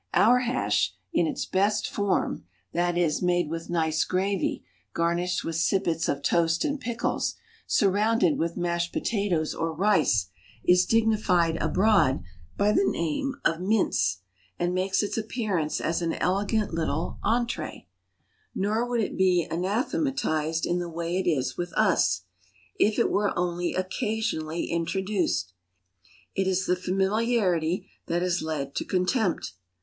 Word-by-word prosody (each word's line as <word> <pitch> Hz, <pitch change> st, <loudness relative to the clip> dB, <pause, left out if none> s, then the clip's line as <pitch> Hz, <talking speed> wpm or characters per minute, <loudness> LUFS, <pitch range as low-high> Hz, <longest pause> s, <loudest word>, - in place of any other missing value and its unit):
Our 245 Hz, +3 st, +6 dB
hash, 105 Hz, -, 0 dB, 0.2 s
in 170 Hz, -, +2 dB
its -, -, -3 dB
best 205 Hz, +3 st, +1 dB
form 205 Hz, -2 st, -1 dB, 0.3 s
that 175 Hz, 0 st, +1 dB
is, 165 Hz, -4 st, +1 dB
made 175 Hz, -3 st, +1 dB
with 165 Hz, 0 st, -5 dB
nice 160 Hz, -2 st, +1 dB
gravy, 190 Hz, +1 st, -1 dB, 0.3 s
garnished 170 Hz, +2 st, 0 dB
with 165 Hz, -1 st, -3 dB
sippets 170 Hz, -2 st, +1 dB
of 140 Hz, 0 st, -2 dB
toast 165 Hz, -, +2 dB
and 290 Hz, -1 st, -1 dB
pickles, 235 Hz, -1 st, -2 dB, 0.3 s
surrounded 205 Hz, -3 st, +2 dB
with 170 Hz, +1 st, -1 dB
mashed 170 Hz, -1 st, -1 dB
potatoes 195 Hz, -8 st, 0 dB
or 165 Hz, 0 st, -2 dB
rice 160 Hz, -, +2 dB, 0.3 s
is 180 Hz, 0 st, +4 dB
dignified 210 Hz, -7 st, +2 dB
abroad 195 Hz, -, +3 dB, 0.3 s
by 205 Hz, +1 st, +3 dB
the 385 Hz, -, +3 dB
name 265 Hz, -, -1 dB
of 165 Hz, +1 st, +1 dB
mince, 190 Hz, -, +1 dB, 0.4 s
and 175 Hz, +1 st, 0 dB
makes 190 Hz, +2 st, +1 dB
its 205 Hz, -, -3 dB
appearance 215 Hz, -8 st, -2 dB
as 165 Hz, +2 st, -1 dB
an 165 Hz, -1 st, 0 dB
elegant 200 Hz, +2 st, 0 dB
little 160 Hz, 0 st, -2 dB
entrée. 235 Hz, +2 st, -1 dB, 0.7 s
Nor 215 Hz, +5 st, 0 dB
would 240 Hz, -2 st, +1 dB
it 205 Hz, -, -2 dB
be 180 Hz, -3 st, +3 dB
anathematized 180 Hz, -, 0 dB
in 175 Hz, +1 st, 0 dB
the 175 Hz, -1 st, -4 dB
way 170 Hz, +1 st, -3 dB
it 190 Hz, -, -2 dB
is 140 Hz, -6 st, -1 dB
with 175 Hz, -1 st, -3 dB
us, 90 Hz, -, +2 dB, 0.6 s
if 210 Hz, +1 st, +3 dB
it 235 Hz, -, +2 dB
were 205 Hz, 0 st, +1 dB
only 175 Hz, 0 st, -1 dB
occasionally 185 Hz, -4 st, -2 dB
introduced. 170 Hz, -, -1 dB, 0.8 s
It 190 Hz, -1 st, 0 dB
is 190 Hz, 0 st, +1 dB
the 180 Hz, -, +2 dB
familiarity 190 Hz, -2 st, 0 dB, 0.2 s
that 175 Hz, +1 st, 0 dB
has 180 Hz, 0 st, 0 dB
led 150 Hz, -3 st, -3 dB
to -, -, 0 dB
contempt. 185 Hz, -, 0 dB
180 Hz, 140 wpm, -26 LUFS, 165-205 Hz, 0.8 s, Our